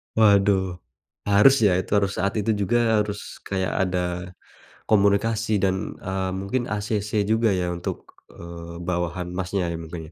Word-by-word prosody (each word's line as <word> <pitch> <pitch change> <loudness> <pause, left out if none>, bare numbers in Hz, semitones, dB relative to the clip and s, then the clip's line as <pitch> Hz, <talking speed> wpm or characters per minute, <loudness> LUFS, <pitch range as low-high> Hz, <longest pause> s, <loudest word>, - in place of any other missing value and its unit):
Waduh, 100 -4 +3 0.5
harus 105 +7 +6
ya, 100 - +5 0.4
saat 100 0 -2
itu 110 +2 0
juga 100 +5 +2 0.2
harus 105 0 -4 0.3
kayak 95 -1 -1
ada 90 0 -1 0.9
komunikasi 110 +2 +2
dan, 95 -1 +2 0.2
eee, 95 0 -3
mungkin 100 +6 -2
acc 105 0 -2 0.2
juga 110 0 +3
ya 90 - -1
untuk, 85 - -5 0.2
eee, 85 0 -9
bawahan 90 0 -2
Masnya 95 0 -1 0.2
mungkin 80 -1 -8
95 Hz, 125 wpm, -24 LUFS, 90-105 Hz, 0.9 s, harus